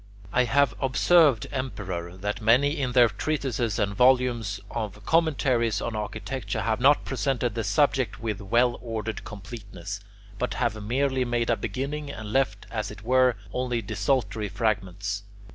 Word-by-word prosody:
I 125 0 +4
have 135 +1 +3
observed, 140 -1 +4
Emperor, 95 -9 -4
that 105 +3 -3
many 140 +7 +3
in 125 -2 -1
their 120 -1 +7
treatises 120 -1 -2
and 100 0 0
volumes 125 -3 +3
of 105 -2 -5
commentaries 130 -9 +2
on 115 0 -3
architecture 110 +1 -4
have 110 0 0
not 140 +4 +4
presented 130 -3 -1
the 115 - -2
subject 130 +1 +1
with 110 -3 -3
well 120 +5 +2
ordered 110 -2 -4
completeness, 100 -2 -8 0.4
but 125 - -1
have 115 -3 -1
merely 130 +4 +1
made 120 -1 0
a - - +4
beginning 140 +8 -4
and 110 -6 -6
left, 130 -7 +1
as 110 -2 -2
it 105 0 -10
were, 130 0 +4 0.2
only 125 -2 -1
desultory 110 +1 -1
fragments. 100 -2 -1
115 Hz, 145 wpm, -26 LUFS, 105-130 Hz, 0.4 s, their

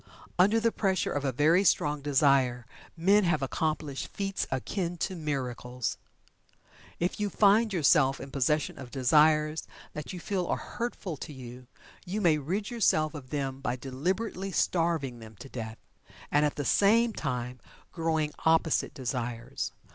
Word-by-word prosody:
Under 205 +5 +5
the 230 0 +2
pressure 190 -5 0
of 145 - -2
a 135 - +1
very 155 +9 +4
strong 150 -5 +2
Desire 135 -4 +2 0.3
men 200 +5 +4
have 155 -5 +1
accomplished 150 0 -2
feats 195 -1 -3
akin 175 +6 -2
to 185 - -2
miracles. 125 -6 -3 1.0
If 175 +4 -1
you 205 -1 0
find 215 +3 +4
yourself 140 -6 +3
in 135 - -8
possession 145 +2 0
of 130 -2 -8
desires 150 +4 +3 0.3
that 150 -1 -6
you 180 - -6
feel 185 -1 -2
are - - 0
hurtful 220 -8 -5
to 150 - -7
you, 125 -2 -10 0.4
you 195 +3 -3
may 165 -6 +3
rid 195 - -3
yourself 155 -9 +2
of 140 -4 -9
them 135 -2 -3
by 125 -2 -1
deliberately 185 - -3
starving 165 -10 0
them 110 -1 -12
to 135 - -11
death, 110 -3 -6 0.5
and 150 +1 +4
at 145 - -4
the 145 - -3
same 225 - +4
time 125 -5 -3 0.3
growing 160 -2 0
opposite 160 -1 +2
desires. 120 -2 -3
150 Hz, 150 wpm, -29 LUFS, 130-180 Hz, 1.0 s, Under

